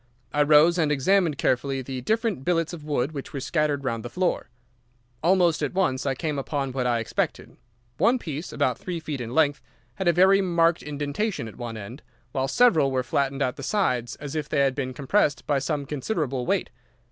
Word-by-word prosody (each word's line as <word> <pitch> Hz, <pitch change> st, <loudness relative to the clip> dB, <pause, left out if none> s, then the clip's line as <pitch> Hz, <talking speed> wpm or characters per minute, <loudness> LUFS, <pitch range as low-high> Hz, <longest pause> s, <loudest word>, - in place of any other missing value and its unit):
I 150 Hz, -, +2 dB
rose 155 Hz, +4 st, +5 dB
and 155 Hz, -2 st, +2 dB
examined 160 Hz, +2 st, +2 dB
carefully 135 Hz, +1 st, 0 dB
the 130 Hz, 0 st, -5 dB
different 220 Hz, -, -1 dB
billets 165 Hz, +1 st, 0 dB
of 160 Hz, -3 st, -8 dB
wood 145 Hz, -2 st, -1 dB
which 140 Hz, -3 st, -7 dB
were 140 Hz, -, -3 dB
scattered 150 Hz, 0 st, 0 dB
round 115 Hz, -4 st, -2 dB
the 120 Hz, -, -6 dB
floor. 180 Hz, +8 st, -1 dB, 0.7 s
Almost 175 Hz, -1 st, +3 dB
at 145 Hz, +3 st, -2 dB
once 140 Hz, -8 st, +1 dB
I 135 Hz, -, +1 dB
came 150 Hz, 0 st, -2 dB
upon 135 Hz, -1 st, -2 dB
what 125 Hz, -1 st, -1 dB
I 120 Hz, -1 st, +2 dB
expected. 115 Hz, -, -3 dB, 0.4 s
One 250 Hz, +2 st, +4 dB
piece, 155 Hz, -, -6 dB
about -, -, 0 dB
three 175 Hz, -2 st, -4 dB
feet 150 Hz, -4 st, -5 dB
in 120 Hz, +1 st, -5 dB
length, 145 Hz, -3 st, +3 dB, 0.4 s
had 190 Hz, -, -2 dB
a -, -, +7 dB
very 190 Hz, +3 st, +5 dB
marked 170 Hz, -2 st, +2 dB
indentation 150 Hz, -, -3 dB
at 110 Hz, -, -10 dB
one 120 Hz, -2 st, -6 dB
end, 110 Hz, +7 st, -9 dB, 0.3 s
while 135 Hz, +1 st, -1 dB
several 160 Hz, -, +4 dB
were 130 Hz, -1 st, 0 dB
flattened 135 Hz, +2 st, 0 dB
at 125 Hz, -2 st, -2 dB
the -, -, -7 dB
sides 125 Hz, -, 0 dB
as 145 Hz, -1 st, -7 dB
if 150 Hz, -2 st, -3 dB
they 140 Hz, -, +2 dB
had 135 Hz, -1 st, +3 dB
been 130 Hz, -2 st, -4 dB
compressed 145 Hz, -2 st, +1 dB
by 145 Hz, -2 st, +1 dB
some 145 Hz, +1 st, -2 dB
considerable 135 Hz, -, -2 dB
weight. -, -, 0 dB
145 Hz, 200 wpm, -25 LUFS, 130-170 Hz, 0.7 s, a